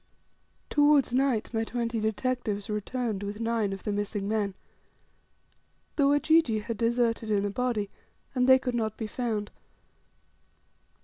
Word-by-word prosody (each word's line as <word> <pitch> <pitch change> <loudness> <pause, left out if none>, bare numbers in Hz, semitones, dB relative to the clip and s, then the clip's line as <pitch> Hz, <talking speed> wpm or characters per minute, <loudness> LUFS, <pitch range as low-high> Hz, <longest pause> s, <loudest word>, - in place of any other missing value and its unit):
Towards 290 -3 +4
night 255 -4 +1
my 225 0 +1
twenty 230 0 -2
detectives 220 -1 -1
returned 215 0 -2
with 205 +1 -5
nine 230 -3 0
of 195 -1 -6
the 210 - -2
missing 205 0 -2
men. 205 -2 -1 1.4
The 285 - +3
Wajiji 290 -6 +3
had 230 0 -4
deserted 230 -1 +1
in 205 -1 +2
a 205 - -1
body, 225 -3 -1 0.4
and 250 -1 +2
they 260 - +9
could 255 -1 -3
not 220 -2 -1
be 220 - -3
found. 215 -2 -3
225 Hz, 135 wpm, -28 LUFS, 210-250 Hz, 1.4 s, they